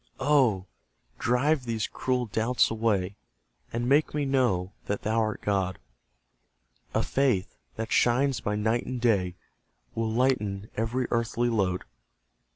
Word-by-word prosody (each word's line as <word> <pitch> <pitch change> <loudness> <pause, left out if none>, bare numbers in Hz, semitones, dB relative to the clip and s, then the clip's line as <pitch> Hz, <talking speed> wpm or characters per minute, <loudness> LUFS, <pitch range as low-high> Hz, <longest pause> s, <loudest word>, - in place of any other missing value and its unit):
Oh, 130 -9 +3 0.5
drive 130 +3 +2
these 115 -2 -1
cruel 125 -1 -1
doubts 115 +3 +1
away; 105 -4 0 0.5
And 120 +1 -2
make 145 +3 +3
me 145 -1 0
know, 120 -9 +1
that 100 - -2
Thou 110 +2 +1
art 110 -1 -1
God! 95 -2 0 1.2
A - - +2
faith, 130 -9 +1 0.2
that 110 +1 -4
shines 130 +2 +3
by 105 - -1
night 110 +3 0
and 130 -1 -3
day, 100 -7 +1 0.6
Will 115 -1 -1
lighten 110 -5 0
every 115 +3 -1
earthly 115 +1 +1
load. 95 -5 0
115 Hz, 130 wpm, -27 LUFS, 105-125 Hz, 1.2 s, Oh